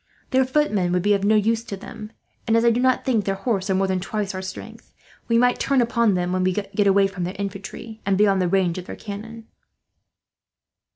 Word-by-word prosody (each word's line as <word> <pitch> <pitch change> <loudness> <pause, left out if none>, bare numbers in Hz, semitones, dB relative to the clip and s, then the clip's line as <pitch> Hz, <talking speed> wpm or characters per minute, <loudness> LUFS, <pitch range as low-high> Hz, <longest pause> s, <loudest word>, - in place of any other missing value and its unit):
Their 260 -1 +3
footmen 255 -10 +1
would 180 -1 +1
then 205 - +2
be - - +6
of 200 -1 0
no 215 +2 +4
use 225 +2 +1
to 200 - -6
them 215 +2 -9 0.4
and, 225 0 +3
as 230 - +2
I 235 - +6
do 235 - 0
not 255 0 +2
think 230 -5 +1
their 195 - 0
horse 195 -2 -2
are 190 - +2
more 195 +1 +2
than 190 -1 0
twice 200 +1 -3
our 185 - -4
strength, 185 0 -9 0.3
we 230 - +3
might 245 +1 +3
turn 275 -1 +2
upon 235 -3 +2
them 180 0 -1
when 185 0 0
we 185 0 +2
get 200 0 -5
them 205 -1 +3
away 195 0 +4
from 195 -2 -4
their 180 +2 -4
infantry, 200 +3 -7
and 195 -1 +1
beyond 200 -2 +3
the 180 - +1
range 185 -1 +1
of 180 - -9
their - - -6
cannon." 220 +2 -8
200 Hz, 240 wpm, -23 LUFS, 190-230 Hz, 0.4 s, be